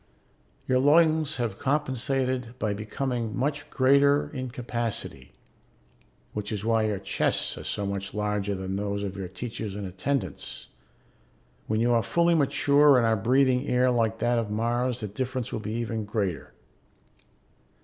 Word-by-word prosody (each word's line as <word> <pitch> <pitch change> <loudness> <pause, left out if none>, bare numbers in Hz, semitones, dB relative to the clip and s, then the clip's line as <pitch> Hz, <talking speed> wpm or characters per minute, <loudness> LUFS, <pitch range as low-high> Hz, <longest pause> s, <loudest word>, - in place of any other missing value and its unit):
Your 130 0 +3
lungs 155 +1 +4
have 115 -5 -3
compensated 130 -3 -1
by 105 -4 -1
becoming 115 +2 -3
much 145 +3 -2
greater 140 +2 +3
in 130 -3 -4
capacity, 120 - -4 1.0
which 105 0 -4
is 105 -1 -3
why 115 -1 +2
your 105 -2 -1
chests 95 - 0
are - - -8
so 100 - -2
much 100 0 -3
larger 105 -1 -1
than 95 0 -4
those 100 0 -2
of 100 -1 -4
your 95 -2 -5
teachers 110 0 -5
and 100 -1 -4
attendants; 95 - -3 1.0
when 110 0 0
you 120 +1 +3
are 115 - +4
fully 170 +7 +2
mature 145 -1 +4
and 120 - +3
are 110 -1 +3
breathing 130 +4 +2
air 125 0 +3
like 115 -2 +1
that 120 +1 +1
of 110 -3 -3
Mars, 120 +3 -1
the 105 - -3
difference 125 +3 -4
will - - -2
be 110 0 -5
even 115 -2 -2
greater. 100 -4 -2
115 Hz, 150 wpm, -27 LUFS, 105-130 Hz, 1.0 s, lungs